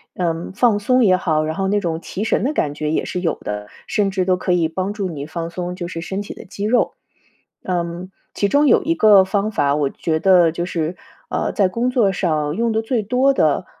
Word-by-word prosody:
嗯， 170 Hz, -2 st, -2 dB
放 220 Hz, 0 st, +3 dB
松 250 Hz, +4 st, +2 dB
也 185 Hz, -1 st, +5 dB
好， 155 Hz, -4 st, 0 dB
然 155 Hz, 0 st, -3 dB
后 195 Hz, 0 st, -1 dB
那 205 Hz, +1 st, +2 dB
种 165 Hz, -4 st, -2 dB
提 195 Hz, -, -5 dB
神 -, -, +1 dB
的 275 Hz, -, +1 dB
感 145 Hz, -, -1 dB
觉 150 Hz, 0 st, -2 dB
也 -, -, 0 dB
是 180 Hz, -, -3 dB
有 165 Hz, -, 0 dB
的， 105 Hz, 0 st, -5 dB, 0.2 s
甚 200 Hz, -2 st, 0 dB
至 190 Hz, -1 st, -1 dB
都 185 Hz, 0 st, +3 dB
可 185 Hz, -, -2 dB
以 175 Hz, -2 st, +2 dB
帮 185 Hz, +5 st, -3 dB
助 200 Hz, -3 st, -3 dB
你 145 Hz, -3 st, -6 dB
放 165 Hz, +2 st, -5 dB
松 180 Hz, +1 st, -5 dB
就 175 Hz, -2 st, -5 dB
是 165 Hz, -2 st, -6 dB
身 190 Hz, +4 st, -4 dB
体 205 Hz, -, -7 dB
的 -, -, -10 dB
肌 200 Hz, +2 st, -6 dB
肉。 245 Hz, +3 st, +2 dB, 0.7 s
嗯， 175 Hz, 0 st, -3 dB, 0.2 s
其 200 Hz, -, 0 dB
中 285 Hz, +6 st, +3 dB
有 -, -, +4 dB
一 330 Hz, -, +1 dB
个 210 Hz, -8 st, +6 dB
方 200 Hz, +2 st, 0 dB
法， 145 Hz, -8 st, +1 dB
我 145 Hz, -2 st, 0 dB
觉 160 Hz, -1 st, -2 dB
得 180 Hz, -2 st, +5 dB
就 170 Hz, +2 st, -3 dB
是， 170 Hz, -1 st, -3 dB, 0.3 s
呃， -, -, -2 dB
在 195 Hz, -3 st, +2 dB
工 235 Hz, +6 st, -1 dB
作 235 Hz, -6 st, +2 dB
上 155 Hz, -4 st, -1 dB
用 230 Hz, 0 st, 0 dB
得 220 Hz, -, +1 dB
最 225 Hz, 0 st, -1 dB
多 255 Hz, +6 st, +2 dB
的， -, -, +1 dB
185 Hz, 250 characters per minute, -20 LUFS, 165-210 Hz, 0.7 s, 个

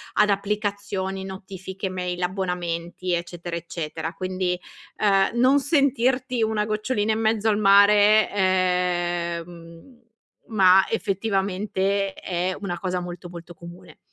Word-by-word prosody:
ad 210 Hz, 0 st, +4 dB
applicazioni, 200 Hz, -1 st, -2 dB
notifiche, 190 Hz, 0 st, -7 dB
mail, 180 Hz, -1 st, -4 dB
abbonamenti, 180 Hz, -1 st, -3 dB
eccetera, 170 Hz, 0 st, -4 dB
eccetera. 165 Hz, -1 st, -5 dB
Quindi, 185 Hz, -1 st, -2 dB, 0.4 s
ehm, 195 Hz, -2 st, +3 dB
non 270 Hz, +3 st, +4 dB
sentirti 260 Hz, -4 st, +1 dB
una 215 Hz, -1 st, 0 dB
gocciolina 215 Hz, 0 st, -1 dB
in 220 Hz, -, -2 dB
mezzo 220 Hz, 0 st, +1 dB
al 210 Hz, -1 st, +3 dB
mare, 205 Hz, +1 st, +6 dB
ehm, 175 Hz, +1 st, -1 dB, 0.5 s
ma, 190 Hz, -3 st, +5 dB
effettivamente, 195 Hz, -1 st, -1 dB
è 180 Hz, 0 st, -3 dB
una 175 Hz, -3 st, -4 dB
cosa 180 Hz, -1 st, -2 dB
molto, 175 Hz, 0 st, -8 dB
molto 175 Hz, 0 st, -10 dB
comune. 170 Hz, +1 st, -13 dB
190 Hz, 110 wpm, -24 LUFS, 175-210 Hz, 0.5 s, mare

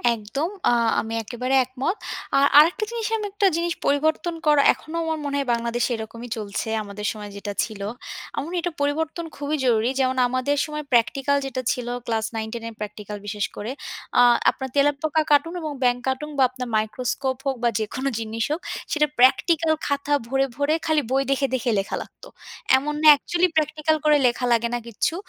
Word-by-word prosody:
একদম, 230 Hz, +10 st, -3 dB, 0.2 s
আ -, -, +3 dB, 0.3 s
আমি 225 Hz, 0 st, -6 dB
একেবারে 250 Hz, +4 st, -2 dB
একমত। 260 Hz, -, -2 dB, 0.4 s
আ -, -, +5 dB, 0.2 s
আরেকটা 340 Hz, +8 st, +4 dB
জিনিস 460 Hz, -2 st, -2 dB
আমি 425 Hz, -, -4 dB
একটা 405 Hz, 0 st, +2 dB
জিনিস 340 Hz, 0 st, 0 dB
পরিবর্তন 315 Hz, +4 st, +1 dB
করা, 295 Hz, -1 st, +6 dB
এখনও 315 Hz, +2 st, -8 dB
আমার 320 Hz, -1 st, -2 dB
মনে 285 Hz, 0 st, -2 dB
হয় 275 Hz, -, -2 dB
বাংলাদেশে 235 Hz, +1 st, -1 dB
এরকমই 230 Hz, +2 st, -8 dB
চলছে, 210 Hz, 0 st, -4 dB, 0.2 s
আমাদের 205 Hz, 0 st, -7 dB
সময় 210 Hz, -1 st, -8 dB
যেটা 200 Hz, 0 st, -5 dB
ছিল। 215 Hz, -3 st, -7 dB, 0.5 s
আমার 280 Hz, -, -2 dB
মনে 355 Hz, +2 st, -3 dB
এটা 350 Hz, +1 st, -2 dB
পরিবর্তন 320 Hz, +3 st, -1 dB
খুবই 290 Hz, +1 st, -2 dB
জরুরি। 230 Hz, -1 st, +3 dB
যেমন 260 Hz, 0 st, +1 dB
আমাদের 255 Hz, +3 st, 0 dB
সময় 300 Hz, 0 st, -5 dB
প্র্যাকটিক্যাল 270 Hz, +4 st, +2 dB
যেটা 260 Hz, -1 st, -3 dB
ছিল, 245 Hz, -1 st, -3 dB, 0.2 s
ক্লাস 225 Hz, -1 st, -1 dB
9-10 220 Hz, +1 st, -4 dB
এর -, -, -11 dB
প্র্যাকটিক্যাল 210 Hz, 0 st, -6 dB
বিশেষ 205 Hz, 0 st, -1 dB
করে, 215 Hz, +4 st, -5 dB, 0.5 s
আ -, -, +8 dB, 0.3 s
আপনার 265 Hz, -1 st, -4 dB
তেলাপোকা 290 Hz, +2 st, +2 dB
কাটুন 330 Hz, +4 st, +4 dB
এবং 310 Hz, -2 st, -3 dB
ব্যাঙ 245 Hz, -1 st, +3 dB
কাটুন 265 Hz, +3 st, -2 dB
বা 270 Hz, -, +5 dB
আপনার 255 Hz, -1 st, -6 dB
মাইক্রোস্কোপ 255 Hz, +4 st, -2 dB
হোক 270 Hz, -1 st, 0 dB
বা 240 Hz, -, +4 dB
যেকোনো 260 Hz, +5 st, -2 dB
জিনিস 225 Hz, 0 st, -3 dB
হোক, 315 Hz, +4 st, -1 dB, 0.3 s
সেটা 300 Hz, -1 st, +3 dB
প্র্যাকটিক্যাল 315 Hz, +5 st, +4 dB
খাতা 285 Hz, 0 st, -1 dB
ভরে, 270 Hz, +2 st, +2 dB
ভরে 285 Hz, +2 st, +2 dB
খালি 315 Hz, -1 st, +3 dB
বই 270 Hz, +1 st, +3 dB
দেখে, 275 Hz, 0 st, +2 dB
দেখে 255 Hz, -1 st, -1 dB
লেখা 195 Hz, -, -3 dB
লাগত। -, -, -13 dB, 0.5 s
এমন 295 Hz, +3 st, -2 dB
না? 310 Hz, -, +5 dB
একচুয়ালি 350 Hz, +5 st, +1 dB
প্র্যাকটিক্যাল 310 Hz, 0 st, +1 dB
করে 300 Hz, -1 st, +6 dB
লেখা 245 Hz, +1 st, -1 dB
লাগে 235 Hz, 0 st, +2 dB
না 240 Hz, -, 0 dB
কিচ্ছু। 235 Hz, +8 st, -1 dB
270 Hz, 185 wpm, -23 LUFS, 235-305 Hz, 0.5 s, আ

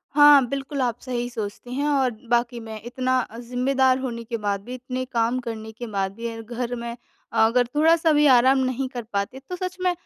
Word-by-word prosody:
हाँ, 290 Hz, -3 st, +8 dB
बिल्कुल 275 Hz, 0 st, -3 dB
आप 245 Hz, -1 st, -1 dB
सही 245 Hz, -2 st, -3 dB
सोचती 230 Hz, +1 st, -6 dB
हैं 285 Hz, +3 st, -1 dB
और 270 Hz, -4 st, +2 dB, 0.2 s
वाक़ई 240 Hz, 0 st, +1 dB
मैं 220 Hz, -1 st, -8 dB
इतना 255 Hz, +1 st, 0 dB
अ, 230 Hz, -2 st, -5 dB
ज़िम्मेदार 255 Hz, +2 st, +2 dB
होने 235 Hz, -3 st, -4 dB
के 230 Hz, +1 st, -4 dB
बाद 200 Hz, -2 st, -2 dB
भी 250 Hz, -, -7 dB
इतने 255 Hz, 0 st, -4 dB
काम 240 Hz, 0 st, 0 dB
करने 220 Hz, -2 st, -6 dB
के 235 Hz, +2 st, -8 dB
बाद 195 Hz, -2 st, -1 dB
भी 230 Hz, +1 st, -4 dB
अ, -, -, -8 dB
घर 240 Hz, +2 st, -4 dB
में 235 Hz, 0 st, -5 dB, 0.4 s
अगर 230 Hz, +3 st, +3 dB
थोड़ा-सा 325 Hz, +1 st, +4 dB
भी 295 Hz, 0 st, +4 dB
आराम 260 Hz, +3 st, +5 dB
नहीं 260 Hz, +1 st, -1 dB
कर 245 Hz, -2 st, -6 dB
पाते 200 Hz, +6 st, -2 dB
तो 360 Hz, -, -3 dB
सच 365 Hz, 0 st, -5 dB
में 365 Hz, -, +3 dB
245 Hz, 210 wpm, -24 LUFS, 230-265 Hz, 0.4 s, हाँ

